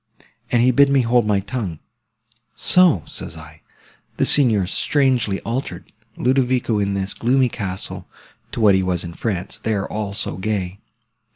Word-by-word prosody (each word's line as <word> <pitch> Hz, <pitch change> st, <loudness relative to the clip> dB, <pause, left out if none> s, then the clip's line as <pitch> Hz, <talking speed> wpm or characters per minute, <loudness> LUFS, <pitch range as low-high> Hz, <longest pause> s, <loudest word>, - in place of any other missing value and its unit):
And 120 Hz, -1 st, +3 dB
he 130 Hz, -, +4 dB
bid 140 Hz, +2 st, +4 dB
me 140 Hz, -1 st, +3 dB
hold 120 Hz, -2 st, +2 dB
my 100 Hz, -2 st, +1 dB
tongue. 100 Hz, -6 st, -5 dB, 0.8 s
So, 170 Hz, -, +3 dB
says -, -, -5 dB
I, -, -, -13 dB, 0.6 s
the -, -, +2 dB
Signor's 110 Hz, -10 st, +4 dB
strangely 130 Hz, -8 st, +1 dB
altered, 125 Hz, +4 st, -5 dB, 0.3 s
Ludovico, 125 Hz, -3 st, +1 dB
in 100 Hz, -1 st, -1 dB
this 95 Hz, 0 st, -3 dB
gloomy 125 Hz, +2 st, +1 dB
castle, 95 Hz, -5 st, -6 dB, 0.4 s
to -, -, -5 dB
what 105 Hz, -3 st, +5 dB
he 95 Hz, -, +2 dB
was 90 Hz, -2 st, -1 dB
in 85 Hz, -1 st, -7 dB
France; 95 Hz, -2 st, -4 dB
there, 105 Hz, -3 st, -2 dB
all 105 Hz, -2 st, -4 dB
so 95 Hz, -6 st, -3 dB
gay! 95 Hz, -1 st, -3 dB
110 Hz, 155 wpm, -20 LUFS, 95-125 Hz, 0.8 s, what